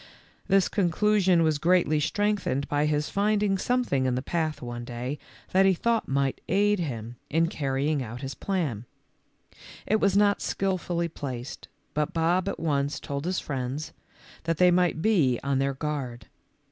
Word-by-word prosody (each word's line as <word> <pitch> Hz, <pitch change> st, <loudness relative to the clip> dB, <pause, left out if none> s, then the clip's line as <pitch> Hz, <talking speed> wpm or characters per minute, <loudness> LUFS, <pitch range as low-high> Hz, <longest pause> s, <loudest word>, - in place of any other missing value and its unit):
This 195 Hz, -1 st, +4 dB
conclusion 190 Hz, -1 st, +2 dB
was 155 Hz, -2 st, +1 dB
greatly 170 Hz, -2 st, +3 dB
strengthened 200 Hz, -6 st, 0 dB
by 145 Hz, +1 st, +1 dB
his 150 Hz, 0 st, 0 dB
finding 205 Hz, -1 st, +1 dB
something 240 Hz, -, +1 dB
in 125 Hz, -, +1 dB
the 130 Hz, -, -2 dB
path 155 Hz, -3 st, -1 dB
one 120 Hz, -1 st, -6 dB
day 125 Hz, +4 st, -5 dB, 0.3 s
that 190 Hz, +1 st, +5 dB
he 190 Hz, -, +4 dB
thought 230 Hz, +5 st, 0 dB
might 135 Hz, 0 st, 0 dB
aid 205 Hz, +2 st, +3 dB
him 120 Hz, -7 st, -4 dB
in 165 Hz, +2 st, +3 dB
carrying 140 Hz, -2 st, -1 dB
out 120 Hz, 0 st, -6 dB
his 135 Hz, 0 st, -4 dB
plan. 150 Hz, -, -2 dB, 1.0 s
It 215 Hz, +2 st, +2 dB
was 200 Hz, -1 st, +3 dB
not 205 Hz, 0 st, +3 dB
skilfully 180 Hz, -3 st, -1 dB
placed, 130 Hz, -6 st, -7 dB, 0.3 s
but 150 Hz, +1 st, -1 dB
Bob 175 Hz, +4 st, +2 dB
at -, -, -5 dB
once 145 Hz, -2 st, 0 dB
told 140 Hz, +1 st, -5 dB
his 185 Hz, +1 st, 0 dB
friends, 135 Hz, +2 st, -4 dB, 0.5 s
that 165 Hz, -1 st, 0 dB
they 180 Hz, +1 st, +5 dB
might 175 Hz, -2 st, +2 dB
be 155 Hz, -, +3 dB
on 140 Hz, -1 st, +1 dB
their 135 Hz, 0 st, 0 dB
guard. 130 Hz, -6 st, -4 dB
155 Hz, 160 wpm, -27 LUFS, 135-190 Hz, 1.0 s, that